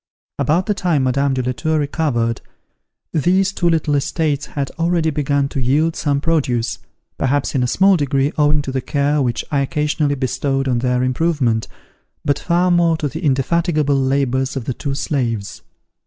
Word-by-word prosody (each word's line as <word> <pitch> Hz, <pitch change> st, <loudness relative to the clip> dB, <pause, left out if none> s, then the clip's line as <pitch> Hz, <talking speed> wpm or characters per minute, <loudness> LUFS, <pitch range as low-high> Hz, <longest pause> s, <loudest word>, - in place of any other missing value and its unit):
About 170 Hz, +5 st, +1 dB
the 210 Hz, -, +1 dB
time 175 Hz, -8 st, 0 dB
Madame 135 Hz, +1 st, +1 dB
de 130 Hz, -, -1 dB
la 125 Hz, -, -1 dB
Tour 155 Hz, +5 st, -1 dB
recovered, 140 Hz, -6 st, -1 dB, 0.7 s
these 185 Hz, +5 st, +2 dB
two 175 Hz, -2 st, +1 dB
little 160 Hz, -3 st, +1 dB
estates 145 Hz, +1 st, 0 dB
had 140 Hz, -2 st, -4 dB
already 165 Hz, -1 st, +1 dB
begun 145 Hz, -1 st, 0 dB
to 135 Hz, -, -3 dB
yield 150 Hz, +6 st, +1 dB
some 145 Hz, -3 st, 0 dB
produce, 135 Hz, -7 st, 0 dB, 0.4 s
perhaps 140 Hz, +1 st, 0 dB
in 135 Hz, -, +1 dB
a 125 Hz, -, +1 dB
small 190 Hz, +8 st, +4 dB
degree 140 Hz, -1 st, +1 dB
owing 150 Hz, -1 st, +2 dB
to 135 Hz, -, -4 dB
the 130 Hz, 0 st, -2 dB
care 145 Hz, +2 st, 0 dB
which 120 Hz, -3 st, -1 dB
I 145 Hz, -, +2 dB
occasionally 150 Hz, +1 st, 0 dB
bestowed 135 Hz, +1 st, -1 dB
on 125 Hz, -2 st, +1 dB
their 125 Hz, 0 st, 0 dB
improvement, 130 Hz, -4 st, 0 dB, 0.6 s
but 145 Hz, -, +1 dB
far 180 Hz, +1 st, +1 dB
more 170 Hz, -2 st, +3 dB
to 150 Hz, -, -2 dB
the 160 Hz, +7 st, -7 dB
indefatigable 150 Hz, +2 st, +1 dB
labours 135 Hz, -1 st, 0 dB
of 130 Hz, -4 st, -4 dB
the 130 Hz, -, -2 dB
two 140 Hz, +2 st, -4 dB
slaves. 115 Hz, -8 st, -2 dB
145 Hz, 170 wpm, -19 LUFS, 130-160 Hz, 0.7 s, small